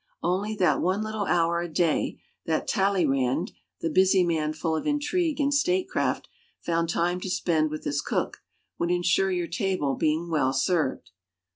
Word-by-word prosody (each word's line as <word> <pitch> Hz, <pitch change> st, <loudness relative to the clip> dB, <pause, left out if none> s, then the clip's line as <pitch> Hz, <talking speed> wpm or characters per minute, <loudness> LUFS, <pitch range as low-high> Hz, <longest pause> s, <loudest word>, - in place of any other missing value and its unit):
Only 195 Hz, +5 st, 0 dB
that 190 Hz, -4 st, +2 dB
one 190 Hz, +4 st, +1 dB
little 215 Hz, -2 st, -3 dB
hour 170 Hz, 0 st, +2 dB
a 175 Hz, -, -4 dB
day 165 Hz, 0 st, +1 dB, 0.3 s
that 160 Hz, -1 st, 0 dB
Talleyrand, 175 Hz, -, +1 dB, 0.3 s
the 165 Hz, -, 0 dB
busy 190 Hz, +1 st, +4 dB
man 160 Hz, -3 st, 0 dB
full 160 Hz, +1 st, -2 dB
of 160 Hz, -, -3 dB
intrigue 300 Hz, +2 st, 0 dB
and 285 Hz, 0 st, +2 dB
statecraft, 360 Hz, +6 st, 0 dB, 0.3 s
found 165 Hz, -1 st, -1 dB
time 175 Hz, +2 st, 0 dB
to 190 Hz, -, -5 dB
spend 160 Hz, -3 st, +1 dB
with 155 Hz, 0 st, -6 dB
his 145 Hz, 0 st, -1 dB
cook, -, -, -2 dB, 0.4 s
would 170 Hz, -, 0 dB
insure 180 Hz, +2 st, +2 dB
your 180 Hz, -2 st, -1 dB
table 170 Hz, -5 st, -1 dB
being 160 Hz, +4 st, 0 dB
well 135 Hz, -4 st, +2 dB
served. 135 Hz, -, 0 dB
175 Hz, 160 wpm, -26 LUFS, 160-195 Hz, 0.4 s, busy